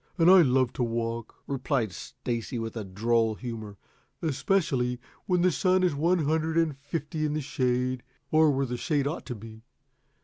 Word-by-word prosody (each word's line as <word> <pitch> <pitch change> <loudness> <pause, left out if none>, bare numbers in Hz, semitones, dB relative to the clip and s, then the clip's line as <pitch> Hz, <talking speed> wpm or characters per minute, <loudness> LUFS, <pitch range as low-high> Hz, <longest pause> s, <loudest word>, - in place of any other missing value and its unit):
And 170 +1 +6
I 190 -1 +9
love 130 -4 +3
to 125 - -1
walk," 115 0 -3
replied 130 -5 -1
Stacy, 115 +7 -5
with 115 0 -4 0.2
droll 115 +1 +2
humor. 110 -4 -7 0.5
"Especially 135 -6 +1 0.3
when 180 -2 +2
the 185 - +4
sun 185 +5 +2
is 180 -4 +3
one 165 +3 +2
hundred 160 +2 0
and 165 -4 +2
fifty 150 +2 -4
in 150 -1 0
the 155 - -1
shade, 130 -2 0 0.3
or 155 0 +5
where 135 -1 +1
the 125 -1 -3
shade 145 +1 0
ought 150 +4 -3
to 125 - -4
be. 110 +1 -11
135 Hz, 170 wpm, -28 LUFS, 120-160 Hz, 0.5 s, I